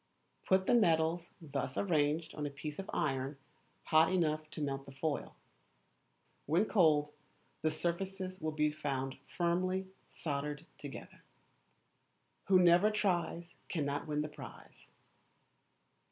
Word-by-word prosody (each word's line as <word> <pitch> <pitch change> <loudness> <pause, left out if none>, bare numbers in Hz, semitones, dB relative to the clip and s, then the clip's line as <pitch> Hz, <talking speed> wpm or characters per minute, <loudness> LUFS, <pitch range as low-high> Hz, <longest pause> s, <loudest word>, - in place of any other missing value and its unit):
Put 190 0 +4
the - - +3
metals 165 -5 +3
thus 140 -5 -4
arranged 155 -3 +1
on 150 -1 -3
a - - -3
piece 145 +3 -6
of 195 - -6
iron 135 0 -1 0.5
hot 160 +1 +5
enough 155 -4 +1
to - - -7
melt 135 -1 -3
the - - -9
foil. 145 +2 -3 1.1
When 170 +8 +3
cold 150 -8 +3 0.5
the 155 - +2
surfaces 185 +3 -3
will 155 0 -1
be 150 0 +1
found 135 -3 -3 0.2
firmly 185 +2 +1 0.2
soldered 150 0 -3
together. - - -9 1.3
[WHO 190 - +6
NEVER 175 +4 +6
TRIES 175 -4 -1 0.2
CANNOT 145 -3 -1
WIN 150 -1 0
THE 150 - -4
PRIZE. 150 - -12
160 Hz, 125 wpm, -34 LUFS, 145-175 Hz, 1.3 s, WHO